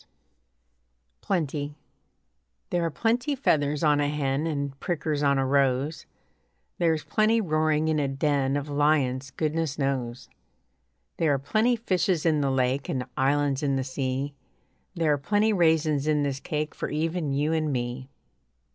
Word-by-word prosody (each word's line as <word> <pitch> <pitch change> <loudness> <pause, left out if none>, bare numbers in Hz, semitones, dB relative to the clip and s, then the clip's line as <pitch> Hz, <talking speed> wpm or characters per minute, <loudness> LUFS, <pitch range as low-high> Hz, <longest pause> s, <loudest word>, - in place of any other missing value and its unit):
PLENTY 150 -5 -2 1.0
There 175 -1 +1
are 165 - +1
plenty 240 - 0
feathers 150 - +1
on 150 -1 +4
a 145 0 +1
hen 145 +1 -1
And 140 -3 -3
prickers 155 -4 -2
on 140 -1 +3
a 135 - +1
rose, 140 +2 +1 0.7
There 165 -2 +3
is 155 - -6
plenty 220 +1 +2
roaring 155 -4 +1
in 155 -1 +1
a 140 - +1
den 135 0 0
Of 145 0 -4
lions, 140 -3 +1
goodness 155 +1 -2
knows; 130 -4 -2 0.9
There 160 -3 +2
are - - 0
plenty 215 - +1
fishes 185 -6 0
in 155 -3 +3
the 140 - +1
lake 130 +1 0
And 130 -2 -2
islands 140 0 +1
in 140 -2 +1
the 135 - 0
sea; 130 +1 -3 0.6
There 165 -3 +2
are 145 - -1
plenty 205 +8 +2
raisins 160 -5 +2
in 150 -1 +2
this 140 -1 -2
cake 150 +1 -3
For - - -4
even 160 0 -1
you 145 +3 0
and 155 -2 0
me. 125 +1 -3
145 Hz, 155 wpm, -26 LUFS, 135-160 Hz, 1.0 s, on